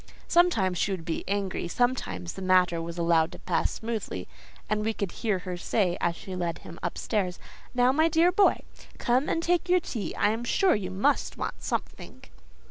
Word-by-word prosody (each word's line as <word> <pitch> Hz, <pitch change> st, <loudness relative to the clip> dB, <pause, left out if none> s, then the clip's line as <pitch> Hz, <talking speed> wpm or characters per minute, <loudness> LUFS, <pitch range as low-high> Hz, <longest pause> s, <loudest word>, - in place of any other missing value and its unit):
Sometimes 220 Hz, -, +3 dB
she -, -, +1 dB
would 185 Hz, -4 st, -3 dB
be 165 Hz, -, -2 dB
angry; 195 Hz, -3 st, -1 dB
sometimes 170 Hz, -, -1 dB
the -, -, -8 dB
matter 180 Hz, -2 st, +3 dB
was 170 Hz, +1 st, -6 dB
allowed 170 Hz, -1 st, +3 dB
to -, -, -8 dB
pass -, -, 0 dB
smoothly, 220 Hz, -, -4 dB, 0.4 s
and 210 Hz, 0 st, 0 dB
we 220 Hz, +1 st, 0 dB
could 200 Hz, -3 st, -2 dB
hear 215 Hz, -4 st, -1 dB
her 180 Hz, 0 st, -5 dB
say 180 Hz, -1 st, +1 dB
as 170 Hz, 0 st, +1 dB
she 190 Hz, +1 st, -7 dB
led 170 Hz, -2 st, -2 dB
him 170 Hz, -, -9 dB
up -, -, -3 dB
stairs: 190 Hz, -5 st, -1 dB, 0.4 s
"Now, 250 Hz, +1 st, +5 dB
my 315 Hz, +4 st, +3 dB
dear 330 Hz, +2 st, +4 dB
boy, 395 Hz, +2 st, +4 dB, 0.4 s
come 250 Hz, +4 st, +1 dB
and 330 Hz, -, 0 dB
take 350 Hz, +1 st, +1 dB
your 365 Hz, 0 st, +5 dB
tea—I 210 Hz, -, -1 dB
am 225 Hz, +2 st, -3 dB
sure 370 Hz, -, +3 dB
you 195 Hz, -3 st, -2 dB
must 190 Hz, +2 st, 0 dB
want -, -, -4 dB
something." 60 Hz, -, -5 dB
200 Hz, 190 wpm, -27 LUFS, 175-245 Hz, 0.4 s, Now